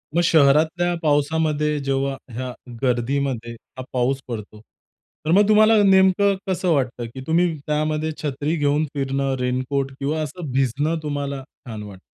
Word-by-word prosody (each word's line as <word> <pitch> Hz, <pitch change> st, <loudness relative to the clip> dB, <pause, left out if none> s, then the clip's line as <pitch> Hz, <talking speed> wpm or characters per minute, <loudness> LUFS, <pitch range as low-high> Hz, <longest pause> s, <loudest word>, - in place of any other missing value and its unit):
मग 170 Hz, -, +4 dB
शहरातल्या 160 Hz, +3 st, +3 dB
पावसामध्ये 150 Hz, 0 st, +1 dB
जेव्हा 135 Hz, 0 st, 0 dB, 0.2 s
ह्या 125 Hz, +2 st, -4 dB, 0.3 s
गर्दीमध्ये 125 Hz, -1 st, -1 dB, 0.3 s
हा 130 Hz, -, -5 dB
पाऊस 130 Hz, +2 st, +1 dB
पडतो, 110 Hz, -3 st, -7 dB, 0.7 s
तर 160 Hz, -, +1 dB
मग 200 Hz, +3 st, +5 dB
तुम्हाला 215 Hz, +1 st, +6 dB
नेमकं 195 Hz, +1 st, +4 dB
कसं 185 Hz, 0 st, 0 dB
वाटतं? 125 Hz, -4 st, -1 dB
की 130 Hz, -, -7 dB
तुम्ही 170 Hz, +1 st, +2 dB
त्यामध्ये 155 Hz, +1 st, 0 dB
छत्री 145 Hz, +2 st, -1 dB
घेऊन 145 Hz, 0 st, +1 dB
फिरणं, 135 Hz, -1 st, -1 dB
रेनकोट 130 Hz, +2 st, -1 dB
किंवा 150 Hz, +3 st, -1 dB
असं 155 Hz, 0 st, -5 dB
भिजणं 135 Hz, +5 st, 0 dB
तुम्हाला 140 Hz, -2 st, -3 dB
छान 115 Hz, -5 st, -10 dB
वाटतं? 100 Hz, -3 st, -10 dB
145 Hz, 140 wpm, -22 LUFS, 130-160 Hz, 0.7 s, तुम्हाला